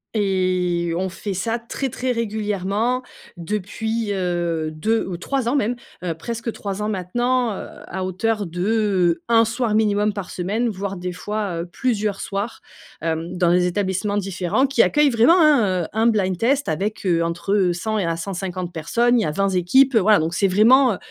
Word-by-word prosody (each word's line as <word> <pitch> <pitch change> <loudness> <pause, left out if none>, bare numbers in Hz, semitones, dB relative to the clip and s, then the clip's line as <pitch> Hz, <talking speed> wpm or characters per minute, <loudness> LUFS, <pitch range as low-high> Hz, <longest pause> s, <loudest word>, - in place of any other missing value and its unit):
Et 185 -4 0
on 190 +2 -1
fait 195 +2 -5
ça 225 +6 -1
très, 250 +3 -4
très 255 +1 -2
régulièrement 215 +1 -1 0.4
depuis, 210 +5 -3
heu, 175 -4 -1
2 220 +9 0
ou 180 -2 -4
3 260 +7 -2
ans, 265 - 0
même, 245 -3 +1 0.3
heu, 175 -2 -1
presque 230 +8 -5
3 200 -2 -5
ans 210 - -1
maintenant, 240 +6 0
heu, - - -7 0.2
à 185 +1 -4
hauteur 205 +3 -1
de 185 -1 +1
1 230 -1 +5
soir 230 0 -1
minimum 210 -1 +2
par 200 -3 -6
semaine, 210 +7 -1
voire 195 -1 -4
des 180 0 -4
fois, 200 -2 -3
heu, - - -5
plusieurs 210 0 -2
soirs, 200 +3 -4 0.4
hem, 165 +2 -3
dans 175 -1 +3
des 180 0 +3
établissements 190 +2 -1
différents 195 +6 0
qui 275 - +4
accueillent 295 -1 +3
vraiment, 245 +9 +5
hein, 220 - +4
heu, - - -7
un 220 +2 +2
blind-test 225 +6 +1
avec 200 +7 -2
heu, 170 -2 +2
entre 180 +3 +1
100 215 +5 -2
et 200 - 0
à 165 0 0
150 180 0 -4
personnes. 235 +10 +1
Il - - +1
y - - -1
a 155 - -1
20 195 +5 0
équipes, 230 +9 +3
voilà, 215 0 +5
donc 160 +2 -2
c'est 200 - +3
vraiment, 230 +6 +5
heu, - - -5
200 Hz, 180 wpm, -21 LUFS, 180-225 Hz, 0.4 s, 1